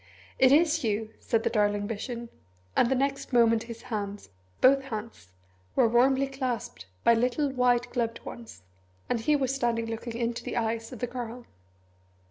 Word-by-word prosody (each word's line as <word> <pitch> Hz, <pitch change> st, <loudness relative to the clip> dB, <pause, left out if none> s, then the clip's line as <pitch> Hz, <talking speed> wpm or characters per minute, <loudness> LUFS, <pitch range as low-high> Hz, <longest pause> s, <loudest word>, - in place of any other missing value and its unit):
"It 260 Hz, -1 st, +6 dB
is 310 Hz, 0 st, +4 dB
you!" 220 Hz, 0 st, -1 dB
said 225 Hz, -1 st, 0 dB
the 230 Hz, -, 0 dB
darling 205 Hz, -2 st, +1 dB
vision, 235 Hz, +2 st, -5 dB, 0.5 s
and 240 Hz, -, +4 dB
the 265 Hz, -, +2 dB
next 275 Hz, +2 st, -1 dB
moment 230 Hz, -2 st, +5 dB
his 230 Hz, 0 st, -8 dB
hands 205 Hz, -4 st, -5 dB, 0.3 s
both 270 Hz, +1 st, +5 dB
hands 220 Hz, -, -7 dB, 0.5 s
were -, -, +5 dB
warmly 260 Hz, +4 st, +4 dB
clasped 255 Hz, -, -4 dB, 0.2 s
by 235 Hz, -, +6 dB
little 250 Hz, +5 st, +1 dB
white 245 Hz, -2 st, +2 dB
gloved 230 Hz, -2 st, -1 dB
ones, 230 Hz, -, -10 dB, 0.5 s
and 235 Hz, -, +1 dB
he 295 Hz, +7 st, +2 dB
was 265 Hz, -2 st, 0 dB
standing 235 Hz, -3 st, 0 dB
looking 225 Hz, +1 st, -5 dB
into 235 Hz, 0 st, -2 dB
the -, -, -4 dB
eyes 225 Hz, 0 st, -1 dB
of 250 Hz, -, -9 dB
the -, -, +1 dB
Girl. 240 Hz, 0 st, -6 dB
235 Hz, 165 wpm, -28 LUFS, 225-255 Hz, 0.5 s, It